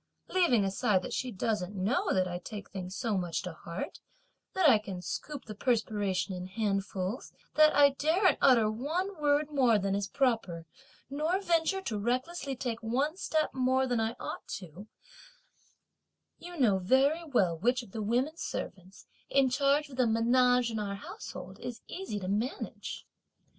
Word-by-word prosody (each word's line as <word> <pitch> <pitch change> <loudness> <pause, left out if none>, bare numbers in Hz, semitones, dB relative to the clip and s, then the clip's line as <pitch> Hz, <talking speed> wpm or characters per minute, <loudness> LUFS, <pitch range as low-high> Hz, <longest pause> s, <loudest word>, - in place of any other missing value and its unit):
Leaving 295 - +3
aside 195 0 +1
that - - -5
she 255 - -2
doesn't 205 -1 -2
know 245 - 0
that 185 -1 +2
I 175 0 -4
take 205 +2 -8
things 185 -1 -6
so 220 -5 0
much 175 -3 -2
to 180 - -5
heart, 170 +3 -6 0.6
that 375 -4 +4
I 235 -7 +7
can 195 -3 -6
scoop 285 +9 -5
the 215 - -7
perspiration 210 -4 0
in 180 0 -5
handfuls, 195 +1 -2 0.2
that 310 0 +6
I 285 -1 +7
daren't 320 +8 +2
utter 240 -5 +6
one 315 - -2
word 295 +1 +2
more 255 -6 +4
than 195 -1 -1
is 200 0 -1
proper, 215 - 0 0.4
nor 310 +7 0
venture 345 +1 +1
to 215 - -2
recklessly 260 +6 -2
take 240 -2 -3
one 265 +8 0
step 315 -4 0
more 260 0 +2
than 245 -3 0
I 225 +1 -1
ought - - -6
to, 185 +2 -11 1.5
you 350 0 -9
know 215 -9 +3
very 270 - +3
well 205 - +2
which 245 +6 +1
of 210 - -15
the 220 - -4
women 250 +9 0
servants, 190 - -6 0.2
in 270 -2 +3
charge 280 +3 +2
of 260 - -11
the 250 -2 +3
menage 245 +2 +3
in 220 - -2
our 200 -1 -3
household, 195 -1 -9
is 245 -2 -6
easy 370 - -5
to 185 - -5
manage! 215 +7 -3
235 Hz, 165 wpm, -30 LUFS, 200-280 Hz, 1.5 s, I